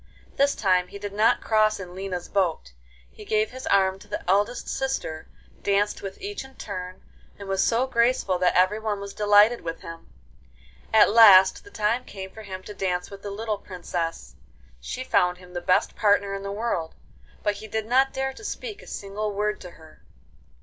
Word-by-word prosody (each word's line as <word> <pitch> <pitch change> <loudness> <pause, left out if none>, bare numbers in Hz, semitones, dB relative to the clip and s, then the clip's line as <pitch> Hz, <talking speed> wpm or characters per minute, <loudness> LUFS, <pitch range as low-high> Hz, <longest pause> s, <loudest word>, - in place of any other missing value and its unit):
This 280 +1 +2
time 185 -3 +2
he 200 - -9
did 200 0 -6
not 215 +2 +3
cross 215 -1 +2
in 180 -2 -8
Lina's 185 -2 -5
boat. 170 - -1 0.4
He - - -12
gave 215 +1 0
his 260 +1 -8
arm 190 -1 +3
to - - -15
the - - -6
eldest 205 +6 +1
sister, 265 -12 -3 0.3
danced 205 +1 +1
with 195 -1 -7
each 405 -3 -5
in 265 0 -15
turn, 185 -2 -7 0.3
and 200 - -9
was 195 0 +1
so 235 +2 +2
graceful 235 -7 +1
that 180 0 +2
everyone 210 +3 +2
was 200 0 -7
delighted 210 +3 +5
with 165 0 -6
him. 165 0 -10 0.8
At 220 -2 +6
last 195 -4 +8
the 405 - -14
time 225 - 0
came 190 -4 -8
for 220 - -11
him 190 -3 -8
to 210 - -9
dance 180 -2 -2
with 200 0 -10
the 205 - -6
little 210 +1 -3
Princess. 175 -3 -5 0.5
She - - -5
found 180 0 +2
him 180 0 -15
the 175 - -4
best 180 +1 +2
partner 200 -2 +2
in 195 - -4
the 200 0 -5
world, 200 -6 -3 0.5
but 205 -1 0
he 215 +2 -9
did 220 0 -3
not 265 +4 +3
dare 265 0 -2
to 425 - -13
speak 430 0 -6
a - - -15
single 205 +2 -4
word 210 +1 -2
to 180 - -8
her. 160 -2 -17
200 Hz, 190 wpm, -25 LUFS, 185-220 Hz, 0.8 s, last